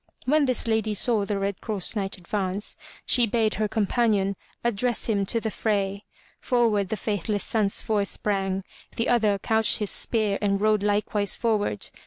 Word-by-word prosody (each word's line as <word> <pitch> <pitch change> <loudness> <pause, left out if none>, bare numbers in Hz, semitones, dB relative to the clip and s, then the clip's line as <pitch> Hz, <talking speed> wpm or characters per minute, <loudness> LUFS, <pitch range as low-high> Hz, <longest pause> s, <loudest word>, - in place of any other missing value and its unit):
When 295 +2 +3
this 255 -2 +1
lady 220 -1 +1
saw 215 -1 +2
the 200 0 -1
Red 195 -1 -2
Cross 210 -2 -2
Knight 195 -2 -2
advance, 190 +2 -2 0.3
she 240 -2 +4
bade 220 0 +1
her 215 - +2
companion 205 -2 +1 0.3
address 235 +1 0
him 200 -4 0
to 230 - +2
the 220 -1 -3
fray. 200 -1 -1 0.3
Forward 225 -6 +1
the 220 - -2
faithless 205 0 -2
Sansfoy 210 -1 0
sprang. 195 -2 -1 0.3
The 230 - 0
other 220 -4 +3
couched 220 +2 +2
his 210 -2 -1
spear 215 -4 -1
and 200 -1 +1
rode 215 0 +2
likewise 205 0 0
forward. 215 - 0
210 Hz, 160 wpm, -25 LUFS, 200-225 Hz, 0.3 s, she